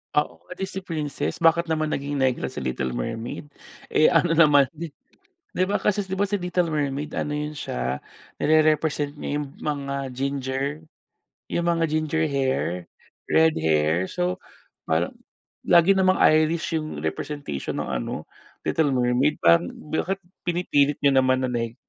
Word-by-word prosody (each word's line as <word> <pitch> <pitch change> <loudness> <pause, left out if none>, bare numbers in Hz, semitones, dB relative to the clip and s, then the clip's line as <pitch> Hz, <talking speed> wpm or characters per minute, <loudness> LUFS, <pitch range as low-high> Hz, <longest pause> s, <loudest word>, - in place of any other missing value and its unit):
Oo, 150 - 0
pati 190 +1 -5
si 190 - -6
Princess 155 -5 -3
bakit 165 0 +3
naman 155 -1 +1
naging 140 -1 -2
negra 130 -2 0
sa - - -5
Little 65 0 -2
Mermaid? 115 - -4 0.4
Eh, 155 - +4
ano 165 -1 +3
naman 145 -4 +6
di 165 0 -6 0.6
di 185 - 0
ba 200 - -1
kasi 205 -1 +1
'di 190 - -6
ba 195 +1 0
si 205 - +1
Little 180 -1 0
Mermaid 145 -1 -2
ano 150 - -1
yun 150 0 -3
siya, 65 - -2 0.4
nirerepresent 155 -1 +2
niya 145 0 -2
yung 145 - -5
mga 140 -3 -3
ginger, 135 +3 -3 0.7
yung 170 0 0
mga 170 -1 +2
ginger 155 +1 0
hair, 130 -10 -1 0.4
red 160 0 +5
hair? 80 +3 +2
So 90 0 -2 0.5
parang 80 +2 +1 0.6
lagi 170 +3 +6
namang 190 -1 +4 0.2
Irish 160 +1 +1
yung 155 - -6
representation 80 - -4
ng - - -6
ano, - - -4 0.4
Little 145 -5 +1
Mermaid, 125 +3 +1
parang 85 +1 +5 0.2
bakit 190 +4 -1 0.2
pinipilit 150 -5 +2
niyo 140 - +5
naman 130 -1 +3
na 125 - -1
neg 115 -1 -2
145 Hz, 150 wpm, -24 LUFS, 130-165 Hz, 0.7 s, naman